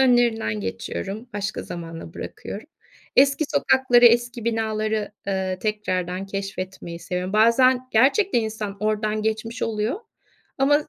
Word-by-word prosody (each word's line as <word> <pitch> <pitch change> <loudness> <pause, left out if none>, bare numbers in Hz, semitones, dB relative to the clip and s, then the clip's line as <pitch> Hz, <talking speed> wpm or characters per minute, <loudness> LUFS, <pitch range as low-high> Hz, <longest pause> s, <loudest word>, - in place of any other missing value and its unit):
önlerinden 240 - +3
geçiyorum, 95 - -5
başka 200 -1 -3
zamana 165 -1 -8
bırakıyorum. 215 - -7 0.5
Eski 275 +3 +5
sokakları, 255 -3 +4
eski 235 0 +3
binaları, 220 -2 -1 0.2
ııı, 190 -1 -1
tekrardan 185 -3 -2
keşfetmeyi 190 -3 -5
seviyorum. 180 +2 -3
Bazen 250 +4 +4
gerçekten 275 - +4
insan 220 -2 -4
oradan 215 0 0
geçmiş 220 +3 -2
oluyor 225 - -1 0.6
ama 290 +3 +3
215 Hz, 110 wpm, -23 LUFS, 190-240 Hz, 0.6 s, Eski